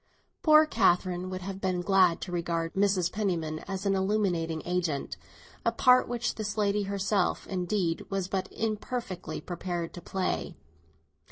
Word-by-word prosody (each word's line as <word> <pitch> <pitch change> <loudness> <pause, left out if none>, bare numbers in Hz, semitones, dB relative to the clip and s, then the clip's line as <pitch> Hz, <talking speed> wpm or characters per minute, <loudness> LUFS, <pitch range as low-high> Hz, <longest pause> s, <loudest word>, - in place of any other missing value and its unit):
Poor 310 0 +7
Catherine 185 - +2
would 185 0 -5
have 195 +1 -6
been 185 -2 0
glad 185 -2 +4
to 180 - -5
regard 170 -1 -2
Mrs. 195 -3 +2
Penniman 165 -7 -1
as 195 0 -4
an 200 - +3
illuminating 190 -5 0
agent, 175 -5 -1 0.5
a - - +2
part 250 -1 +5
which 235 -2 -1
this 215 -1 -4
lady 205 0 +2
herself 200 -1 0
indeed 180 -2 -1
was 195 -2 -1
but 190 -1 -3
imperfectly 215 -3 -3
prepared 175 -1 -4
to 175 - -8
play. 190 0 -2
190 Hz, 145 wpm, -29 LUFS, 175-205 Hz, 0.5 s, Poor